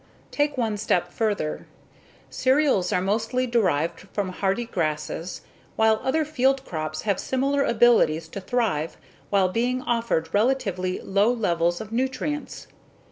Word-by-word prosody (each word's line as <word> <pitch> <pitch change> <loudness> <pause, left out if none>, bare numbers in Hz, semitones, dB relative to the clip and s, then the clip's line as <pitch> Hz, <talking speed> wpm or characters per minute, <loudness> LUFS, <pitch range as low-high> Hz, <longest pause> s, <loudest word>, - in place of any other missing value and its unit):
Take 290 -1 0
one 220 -4 0
step 180 -3 0
further. 205 -9 -2 0.6
Cereals 260 -8 +2
are 180 - +1
mostly 225 +6 0
derived 180 -7 0
from 200 -2 -1
hardy 195 +5 -1
grasses 165 -3 -3 0.3
while 220 0 +3
other 310 +4 +1
field 270 -2 +1
crops 155 -1 -4
have 200 -3 0
similar 275 +2 0
abilities 225 - +3
to 200 - -6
thrive 190 -8 -1 0.3
while 195 -2 +3
being 250 +5 -1
offered 230 -9 -1
relatively 205 -6 0
low 200 +4 +2
levels 175 -7 0
of 220 -1 -8
nutrients. 265 +5 -3
215 Hz, 130 wpm, -25 LUFS, 180-250 Hz, 0.6 s, while